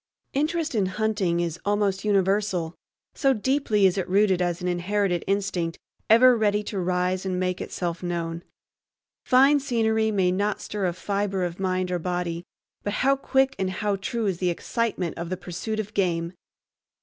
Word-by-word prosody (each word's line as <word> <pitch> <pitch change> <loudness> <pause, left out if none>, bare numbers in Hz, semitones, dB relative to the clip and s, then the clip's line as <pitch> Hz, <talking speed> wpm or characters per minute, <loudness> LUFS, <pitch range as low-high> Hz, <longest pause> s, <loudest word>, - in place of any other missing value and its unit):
Interest 310 +2 0
in 205 -5 +1
hunting 195 -3 0
is 170 -1 -3
almost 205 -1 0
universal, 195 -4 +1 0.4
so 270 -3 +2
deeply 235 -3 +1
is 190 +1 +3
it 185 - -3
rooted 190 -1 +3
as 175 -1 0
an 180 - -3
inherited 180 +1 0
instinct 190 -4 -1 0.3
ever 245 +3 +7
ready 210 -2 +1
to 205 -1 -4
rise 180 +1 0
and 185 -1 -2
make 185 0 -1
itself 170 -2 -4
known. 170 -2 -3 0.8
Fine 275 +3 +5
scenery 220 -4 +1
may 190 -4 +2
not 205 +3 0
stir 205 -3 -2
a 175 - -1
fiber 195 +1 -2
of 175 0 -4
mind 185 -1 -1
or 180 - 0
body, 175 -1 -3 0.4
but 205 - -3
how 275 0 +5
quick 270 0 +1
and 190 -1 0
how 205 +2 -1
true 220 +4 -3
is 190 -4 -1
the 180 - +1
excitement 185 -1 -2
of 170 0 -4
the 185 - -2
pursuit 185 +5 -4
of 210 0 -4
game! 170 -3 0
195 Hz, 170 wpm, -25 LUFS, 180-215 Hz, 0.8 s, ever